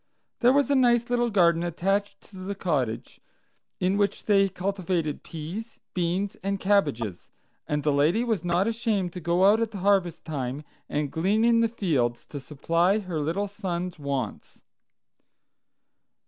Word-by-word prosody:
There 245 Hz, +1 st, +5 dB
was 280 Hz, +1 st, +2 dB
a -, -, +4 dB
nice 240 Hz, -2 st, +3 dB
little 240 Hz, -1 st, +2 dB
garden 170 Hz, -5 st, +3 dB
attached 195 Hz, +4 st, -1 dB
to 195 Hz, -, -15 dB
the 190 Hz, +2 st, -5 dB
cottage, 140 Hz, -, -2 dB, 0.6 s
in 185 Hz, +2 st, +1 dB
which 205 Hz, -1 st, 0 dB
they 195 Hz, -2 st, +4 dB
cultivated 180 Hz, -5 st, -2 dB
peas, 175 Hz, +9 st, -7 dB
beans, 180 Hz, +3 st, -1 dB
and 195 Hz, +1 st, -2 dB
cabbages, 145 Hz, -, 0 dB, 0.4 s
and 150 Hz, -1 st, -1 dB
the 150 Hz, -, +2 dB
lady 155 Hz, +11 st, +2 dB
was 225 Hz, -8 st, -1 dB
not 175 Hz, +2 st, +1 dB
ashamed 220 Hz, -5 st, -1 dB
to 180 Hz, -, -5 dB
go 175 Hz, +3 st, +2 dB
out 210 Hz, +3 st, +5 dB
at 225 Hz, -2 st, -2 dB
harvest 190 Hz, -3 st, +1 dB
time 140 Hz, -2 st, -4 dB, 0.3 s
and 145 Hz, -1 st, -1 dB
glean 200 Hz, +7 st, +1 dB
in 235 Hz, -1 st, +4 dB
the 230 Hz, 0 st, +3 dB
fields 140 Hz, -, -1 dB
to 145 Hz, -, -6 dB
supply 165 Hz, +7 st, +1 dB
her 185 Hz, -6 st, -3 dB
little 170 Hz, +7 st, -1 dB
son's 180 Hz, -4 st, -4 dB
wants. 140 Hz, -6 st, -4 dB
185 Hz, 150 wpm, -26 LUFS, 160-205 Hz, 0.6 s, There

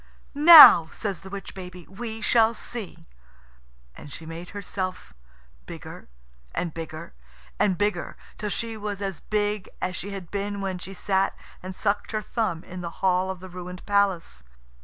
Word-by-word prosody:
"Now," 295 Hz, -, +10 dB
says 200 Hz, -5 st, -4 dB
the 190 Hz, -, -11 dB
witch 195 Hz, 0 st, -8 dB
baby, 180 Hz, -2 st, -10 dB
"we 220 Hz, +3 st, -7 dB
shall 230 Hz, +1 st, +3 dB
see." 220 Hz, -4 st, -7 dB, 0.9 s
And 145 Hz, -, -12 dB
she 160 Hz, -, -9 dB
made 165 Hz, +2 st, -8 dB
herself 185 Hz, -, -5 dB, 0.5 s
bigger -, -, -10 dB, 0.5 s
and 170 Hz, -3 st, -2 dB
bigger 160 Hz, -, -8 dB, 0.5 s
and 190 Hz, -4 st, +2 dB
bigger, 205 Hz, +1 st, -2 dB, 0.2 s
till 210 Hz, -, -3 dB
she 225 Hz, +2 st, -3 dB
was 205 Hz, -2 st, -5 dB
as 195 Hz, -3 st, -4 dB
big 210 Hz, -2 st, -2 dB
as 185 Hz, 0 st, -3 dB
she 200 Hz, -, -6 dB
had 195 Hz, -4 st, -8 dB
been 200 Hz, 0 st, -3 dB
when 190 Hz, -2 st, -3 dB
she 195 Hz, +2 st, -9 dB
sat 190 Hz, +1 st, 0 dB, 0.2 s
and 185 Hz, 0 st, -7 dB
sucked 205 Hz, +2 st, -1 dB
her 215 Hz, -, -1 dB
thumb 190 Hz, -8 st, -2 dB
in 185 Hz, 0 st, -8 dB
the 170 Hz, -, -4 dB, 0.2 s
hall 185 Hz, 0 st, +2 dB
of 190 Hz, -1 st, -6 dB
the 185 Hz, -, -9 dB
ruined 180 Hz, 0 st, -9 dB
palace. 195 Hz, -, 0 dB
195 Hz, 160 wpm, -25 LUFS, 180-205 Hz, 0.9 s, Now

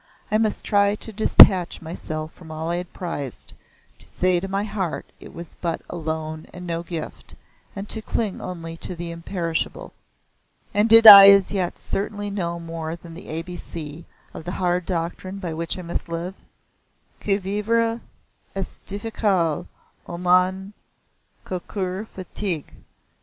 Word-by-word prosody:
I 215 Hz, -, +3 dB
must 220 Hz, -2 st, -1 dB
try 200 Hz, -1 st, +3 dB
to 220 Hz, +1 st, -10 dB
detach 190 Hz, -4 st, +6 dB
myself 155 Hz, -1 st, -6 dB
from 165 Hz, -3 st, -15 dB
all 160 Hz, +1 st, -4 dB
I 175 Hz, -, -1 dB
had 180 Hz, 0 st, -6 dB
prized 145 Hz, -8 st, -6 dB, 0.5 s
to -, -, -14 dB
say 180 Hz, -1 st, +1 dB
to 195 Hz, -, -5 dB
my 195 Hz, +1 st, -1 dB
heart 200 Hz, -5 st, -3 dB
it -, -, -12 dB
was 170 Hz, -2 st, -11 dB
but 170 Hz, -2 st, -1 dB
a -, -, -5 dB
loan 160 Hz, -1 st, -4 dB
and 180 Hz, 0 st, -9 dB
no 170 Hz, -1 st, -3 dB
gift, 170 Hz, -2 st, -8 dB, 0.4 s
and 200 Hz, +1 st, -6 dB
to 220 Hz, -, +3 dB
cling 215 Hz, -2 st, -3 dB
only 165 Hz, -2 st, -7 dB
to 180 Hz, -, -7 dB
the 170 Hz, 0 st, -6 dB
imperishable. 170 Hz, -1 st, -4 dB, 0.8 s
And 210 Hz, +2 st, +2 dB
did 225 Hz, +1 st, +8 dB
I 200 Hz, -2 st, +13 dB
as 200 Hz, -1 st, +5 dB
yet 185 Hz, -4 st, -2 dB
certainly 205 Hz, 0 st, -4 dB
know 170 Hz, -4 st, -3 dB
more 165 Hz, -1 st, -5 dB
than 170 Hz, -1 st, -13 dB
the 170 Hz, -, -11 dB
A 160 Hz, +1 st, -4 dB
B 180 Hz, +1 st, -8 dB
C 160 Hz, -1 st, -8 dB, 0.3 s
of -, -, -8 dB
the 175 Hz, +2 st, -5 dB
hard 180 Hz, -1 st, -1 dB
doctrine 180 Hz, +2 st, -3 dB
by 180 Hz, -4 st, -5 dB
which 165 Hz, +2 st, -3 dB
I 180 Hz, -, -7 dB
must 170 Hz, 0 st, -5 dB
live? 170 Hz, +3 st, -4 dB, 0.9 s
"Que 195 Hz, -1 st, 0 dB
vivre 225 Hz, +4 st, 0 dB, 0.5 s
est 195 Hz, -1 st, +1 dB
difficile, 200 Hz, -6 st, 0 dB, 0.4 s
O 170 Hz, -, -6 dB
mon 185 Hz, +2 st, +2 dB, 0.7 s
cocur 185 Hz, +2 st, -4 dB
fatigue!" 185 Hz, -4 st, -5 dB
180 Hz, 160 wpm, -23 LUFS, 165-200 Hz, 0.9 s, I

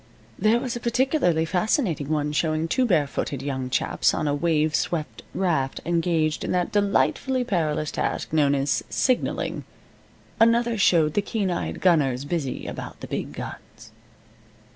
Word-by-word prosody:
There 220 Hz, +2 st, +3 dB
was 245 Hz, -1 st, -3 dB
a -, -, -3 dB
particularly 235 Hz, -, +1 dB
fascinating 180 Hz, -, 0 dB
one 150 Hz, -1 st, 0 dB
showing 155 Hz, +1 st, 0 dB
two 250 Hz, +9 st, +1 dB
barefooted 145 Hz, -, 0 dB
young 130 Hz, -2 st, -3 dB
chaps -, -, +1 dB
on 155 Hz, -, -1 dB
a 145 Hz, -, +1 dB
wave 155 Hz, 0 st, +1 dB
swept 165 Hz, -2 st, -2 dB
raft 155 Hz, -8 st, 0 dB
engaged 165 Hz, -2 st, 0 dB
in -, -, -2 dB
that 180 Hz, -1 st, 0 dB
delightfully 210 Hz, +5 st, +1 dB
perilous 155 Hz, -9 st, -1 dB
task -, -, -3 dB
known 145 Hz, -2 st, +3 dB
as 140 Hz, +1 st, 0 dB
signaling. 255 Hz, -2 st, 0 dB, 0.8 s
Another 230 Hz, +1 st, +4 dB
showed 165 Hz, -7 st, +3 dB
the 205 Hz, -, +2 dB
keen 200 Hz, -2 st, -2 dB
eyed 175 Hz, -, -3 dB
gunners 140 Hz, -7 st, +2 dB
busy 145 Hz, -4 st, -3 dB
about -, -, -7 dB
the -, -, -6 dB
big -, -, -4 dB
guns. -, -, -9 dB
165 Hz, 145 wpm, -24 LUFS, 150-210 Hz, 0.8 s, Another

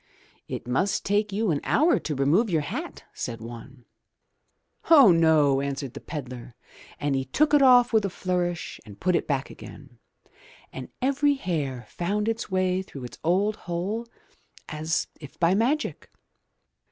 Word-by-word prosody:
"It -, -, -6 dB
must 135 Hz, +11 st, 0 dB
take 205 Hz, +1 st, +1 dB
you 205 Hz, -1 st, 0 dB
an 145 Hz, -, 0 dB
hour 335 Hz, +4 st, +3 dB
to 150 Hz, -, -4 dB
remove 155 Hz, -, +2 dB
your 160 Hz, -4 st, +1 dB
hat/* 145 Hz, -, -6 dB
said 115 Hz, -1 st, -5 dB
one. 120 Hz, +3 st, -11 dB, 1.0 s
0h, 275 Hz, -, +7 dB
no," 155 Hz, -4 st, +4 dB
answered 140 Hz, -2 st, -4 dB
the -, -, -7 dB
pedlar, 125 Hz, -5 st, -8 dB, 0.4 s
and 145 Hz, -1 st, 0 dB
he 135 Hz, -, 0 dB
took 295 Hz, -, +1 dB
it 295 Hz, -, +6 dB
off 245 Hz, -3 st, +6 dB
with 220 Hz, -2 st, +4 dB
a 200 Hz, -, -1 dB
flourish 180 Hz, -1 st, -3 dB
and 105 Hz, -3 st, -13 dB
put 180 Hz, 0 st, +1 dB
it -, -, -1 dB
back 140 Hz, -2 st, -2 dB
again, 135 Hz, -5 st, -13 dB, 0.7 s
and 130 Hz, -1 st, -7 dB
every 280 Hz, +2 st, +2 dB
hair 145 Hz, -, -3 dB
found 205 Hz, +5 st, -2 dB
its 225 Hz, -1 st, -2 dB
way 185 Hz, -1 st, +1 dB
through 140 Hz, -8 st, -10 dB
its 120 Hz, -1 st, -9 dB
old 195 Hz, +6 st, +1 dB
hole 200 Hz, +7 st, -3 dB, 0.6 s
as 155 Hz, +2 st, -2 dB
if 145 Hz, -3 st, -12 dB
by 170 Hz, +1 st, +3 dB
magic! 255 Hz, +9 st, -1 dB
170 Hz, 155 wpm, -25 LUFS, 140-210 Hz, 1.0 s, 0h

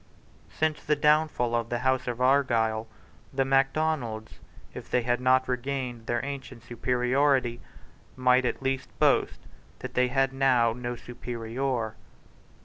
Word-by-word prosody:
Since 155 Hz, -1 st, -1 dB
the 150 Hz, -, +2 dB
downfall 150 Hz, -5 st, +2 dB
of 115 Hz, -1 st, 0 dB
the 120 Hz, -, -1 dB
House 130 Hz, +1 st, 0 dB
of 120 Hz, -1 st, -3 dB
Argyle, 115 Hz, -5 st, +2 dB, 0.4 s
the 135 Hz, 0 st, 0 dB
Macdonalds, 135 Hz, -5 st, 0 dB, 0.3 s
if -, -, -9 dB
they 125 Hz, -, +1 dB
had 120 Hz, +1 st, 0 dB
not 130 Hz, 0 st, +3 dB
regained 125 Hz, -2 st, -3 dB
their 120 Hz, +2 st, -1 dB
ancient 135 Hz, -4 st, -7 dB
superiority, 125 Hz, +1 st, +1 dB, 0.5 s
might 130 Hz, 0 st, +3 dB
at 125 Hz, -, -2 dB
least 135 Hz, 0 st, -1 dB
boast -, -, +2 dB, 0.4 s
that -, -, -7 dB
they 125 Hz, 0 st, +3 dB
had 135 Hz, +1 st, +1 dB
now 125 Hz, -4 st, +3 dB
no 120 Hz, 0 st, -4 dB
superior. 120 Hz, 0 st, -4 dB
125 Hz, 135 wpm, -27 LUFS, 120-135 Hz, 0.5 s, not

